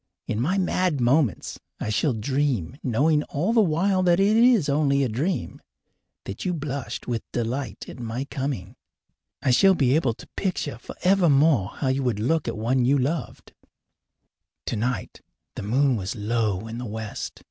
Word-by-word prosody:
In 110 - -2
my 180 +10 +1
mad 180 -4 +1
moments 125 - +1 0.2
I - - -3
shall 135 +5 +1
dream, 125 - -1
knowing 150 +5 +2
all 175 +11 -1
the 230 - +5
while 185 +2 +2
that 175 -1 +3
it 200 +2 +4
is 235 - +5
only 140 -1 +2
a - - +1
dream, 145 - -2 0.6
that 100 - -6
you 180 -1 -1
blushed 140 -4 -5
with 120 -2 -1
delight 120 -2 -3
at - - -10
my 120 +3 -4
coming. 130 -7 -4 0.7
I 135 - +3
shall 190 +9 +5
be 135 -4 +3
able 135 -8 +1
to - - -13
picture 165 - -2
forevermore 155 - +2
how 135 - -1
you 130 +1 0
would 120 -6 -1
look 150 +7 0
at - - -3
one 125 +4 +1
you 135 +4 +3
loved. 145 +5 -3 1.1
Tonight 115 -1 -3 0.3
the - - -5
moon 130 +6 +2
was 100 +3 -4
low 110 -2 -1
in 115 +1 -6
the 125 - -5
west. 110 0 -6
135 Hz, 165 wpm, -24 LUFS, 115-160 Hz, 1.1 s, the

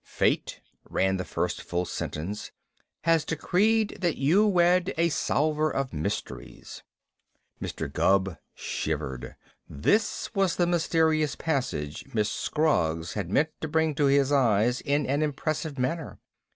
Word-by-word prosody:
"'Fate,'" - - 0 0.3
ran 95 0 +1
the 90 - -3
first - - -2
full 90 +1 -2
sentence, 90 +5 -5 0.5
"'has 165 -1 +3
decreed 205 +8 +1
that 175 -3 0
you 175 +10 +4
wed 180 0 +3
a 170 +1 +3
solver 155 0 +1
of 135 -3 -2
mysteries.'" 75 -1 -5 0.8
Mr. - - -4
Gubb 95 -3 +1 0.2
shivered. 70 -5 -4 0.3
This 205 - 0
was 195 -4 +1
the 175 - +2
mysterious 160 -3 +2
passage 125 - -2
Miss 105 -1 +1
Scroggs 85 - 0
had 100 -5 -3
meant 150 +10 +2
to 160 - -2
bring 160 0 +1
to 145 0 +1
his 140 0 +3
eyes 120 -3 +3
in 145 0 0
an 140 +3 0
impressive 155 0 -2
manner. 135 +5 -2
145 Hz, 130 wpm, -27 LUFS, 105-165 Hz, 0.8 s, you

